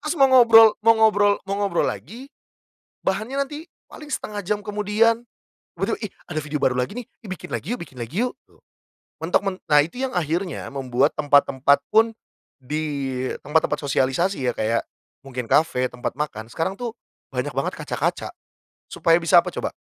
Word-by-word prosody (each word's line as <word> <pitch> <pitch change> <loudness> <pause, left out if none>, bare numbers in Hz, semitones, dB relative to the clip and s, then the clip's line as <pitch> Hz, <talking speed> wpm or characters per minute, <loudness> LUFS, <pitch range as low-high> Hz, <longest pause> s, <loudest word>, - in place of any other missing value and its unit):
Terus 305 +3 -1
mau 270 - +7
ngobrol 225 -3 +8
mau 225 0 +7
ngobrol 205 -2 +4
mau 195 - -1
ngobrol 200 -1 +1
lagi, 255 +5 -7 0.8
bahannya 220 +8 -1
nanti 300 +3 -9 0.2
paling 300 - -11
1/2 210 -5 -4
jam 210 +1 0
kemudian. 210 +3 +1 0.6
Betul, - - 0
"Ih 210 - -4 0.2
ada 155 - -2
video 150 0 -3
baru 125 - +2
lagi 125 +11 -1
nih, 240 - -11 0.2
ih - - -9
bikin 185 - -8
lagi 230 - -3
yuk, - - -8
bikin 135 -6 -12
lagi 165 - -2
yuk", 250 - -6
tuh. - - -27 0.6
Mentok 170 +4 +2
men 195 - 0 0.2
nah 150 - +7
itu 170 +11 -8
yang 265 - -1
akhirnya, 170 +1 -2
membuat 135 +1 +1
tempat-tempat 140 -1 +3
pun, 225 +1 +5 0.5
di 140 -2 -3 0.2
tempat-tempat 155 +2 +1
sosialisasi 140 +3 0
ya 125 - +1
kayak 115 +2 0 0.4
mungkin 125 -3 -5
kafe, 135 -5 +3
tempat 125 - -5
makan, 110 -7 -4
sekarang 165 +10 -2
tuh, 240 -2 -4 0.4
banyak - - -2
banget - - -2
kaca-kaca, - - -2 0.6
supaya 165 -1 +3
bisa 165 - +6
apa - - -4
coba? - - -3
175 Hz, 170 wpm, -23 LUFS, 140-220 Hz, 0.8 s, ngobrol